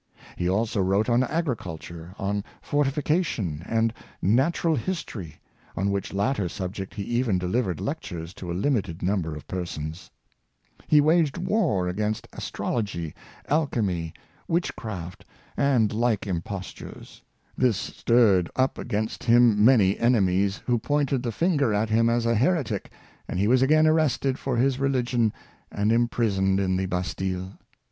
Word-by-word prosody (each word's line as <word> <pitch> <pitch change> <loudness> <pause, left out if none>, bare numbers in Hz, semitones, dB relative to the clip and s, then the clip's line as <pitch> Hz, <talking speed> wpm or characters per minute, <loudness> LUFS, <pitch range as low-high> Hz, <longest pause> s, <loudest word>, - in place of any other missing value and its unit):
He 90 - -1
also 105 +2 +1
wrote 100 +5 +1
on 120 +1 +4
agriculture, 95 - -4
on 100 +1 -2 0.2
fortification, 145 - 0
and 115 0 +1 0.3
natural 145 - +2
history, 115 - -5 0.4
on 100 +2 +1
which 100 -1 -2
latter 100 -1 0
subject 95 +1 -5
he 100 - -3
even 120 -3 0
delivered 90 - -1
lectures 85 0 -5
to 90 -2 -7
a 85 - -2
limited 100 - -1
number 90 -5 0
of 75 - -9
persons. 85 -2 -5 0.8
He 150 -1 +6
waged 155 0 +3
war 175 - +1
against 105 +4 -2
His - - -9
IndomUahle - - -4
Spirit, - - -11 0.3
203 85 -3 -5
astrology, - - -38 0.3
alchemy, 105 - 0 0.3
witchcraft, 110 - -3 0.3
and 125 -7 +2
like 115 -2 +1
impostures. 95 0 -6 0.3
This 125 -6 +2
stirred 105 -6 +2
up 130 +1 +1
against 110 -2 -3
him 115 -3 +5
many 105 -5 +5
enemies, 100 -4 +2
who 120 -2 +1
pointed 140 0 0
the 120 -2 -2
finger 145 - +1
at 110 +1 0
him 115 +1 +4
as 115 0 +1
a 115 - +3
heretic, 125 - 0 0.4
and - - -4
he 100 - +2
was 125 +2 +4
again 155 +4 +5
arrested 155 -4 +2
for 130 -3 -2
his 130 +1 +2
religion 125 -4 +1 0.4
and 105 +2 +1
imprisoned 110 -5 +2
in 95 -1 +1
the 95 0 -1
Bastile. 95 +1 -3
110 Hz, 145 wpm, -25 LUFS, 95-130 Hz, 0.8 s, He